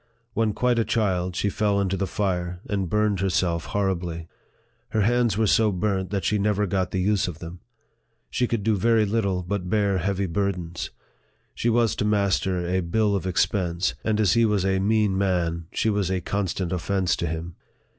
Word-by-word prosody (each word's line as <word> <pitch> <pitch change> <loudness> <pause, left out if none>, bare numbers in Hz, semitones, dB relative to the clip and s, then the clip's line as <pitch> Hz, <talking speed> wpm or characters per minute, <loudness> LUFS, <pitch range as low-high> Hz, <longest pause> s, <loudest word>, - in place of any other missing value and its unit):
When 110 -2 +1
quite 125 +1 +1
a - - +3
child, 95 -6 0
she 100 +2 0
fell 105 -1 +1
into 95 -1 0
the 95 0 -1
fire, 90 -3 -2
and 95 -4 -1
burned 105 -1 +1
herself 90 -3 0
horribly. 90 -5 -2 0.6
Her 110 - 0
hands 120 +1 +2
were 110 - +3
so 110 +1 +3
burnt 95 0 -1
that 100 -2 -2
she 105 - +1
never 105 0 +1
got 95 -1 -1
the 95 - -2
use 100 -1 +2
of 85 -4 -5
them. 85 +1 -9 0.7
She 125 - +1
could 115 -4 -2
do 110 0 +2
very 110 +2 +3
little 100 -4 0
but 90 0 -3
bear 100 -2 +2
heavy 100 +2 -1
burdens. 90 -2 -2 0.6
She 120 - 0
was 115 -1 +2
to - - 0
master 100 -3 +1
a 90 +1 +1
bill 100 +4 +1
of 95 -1 -2
expense; 90 -3 0
and 110 -1 0
as 105 -4 +4
he 115 0 +4
was 105 -4 +2
a 95 0 +2
mean 105 -1 +2
man, 85 -4 0
she 110 - +1
was 100 -3 0
a 95 -1 0
constant 95 -2 -2
offence 90 0 0
to 85 - -2
him. 80 +2 -5
100 Hz, 190 wpm, -25 LUFS, 90-105 Hz, 0.7 s, as